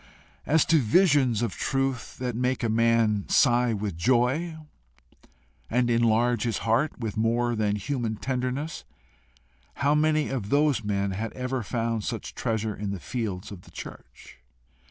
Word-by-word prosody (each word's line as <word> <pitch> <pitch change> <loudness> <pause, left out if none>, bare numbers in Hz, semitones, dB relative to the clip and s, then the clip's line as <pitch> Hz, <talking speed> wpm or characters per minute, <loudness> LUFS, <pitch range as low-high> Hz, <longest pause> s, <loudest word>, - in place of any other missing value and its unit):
As 160 0 +4
to 160 -1 +4
visions 130 - +3
of 120 - -1
truth 135 -3 -2
that 125 -2 -3
make 125 +1 -1
a 115 - +1
man 115 -2 +2
sigh 120 -2 +4
with 105 -4 -3
joy, 130 - +1 1.1
and 120 +1 +1
enlarge 115 0 +2
his 115 -2 0
heart 115 +7 +1
with 110 -4 -4
more 120 +2 +1
than 105 -2 0
human 115 0 -2
tenderness 130 +6 -3 0.9
how 140 +1 +2
many 155 0 +2
of 115 -7 -3
those 145 -2 +2
men 100 -1 -1
had 110 +4 -3
ever 125 0 -3
found 115 0 -2
such - - -5
treasure 110 -2 -2
in 105 0 -4
the 100 -1 -4
fields 105 -4 -4
of 95 -3 -9
the - - -18
church? - - -11
120 Hz, 150 wpm, -26 LUFS, 110-130 Hz, 1.1 s, As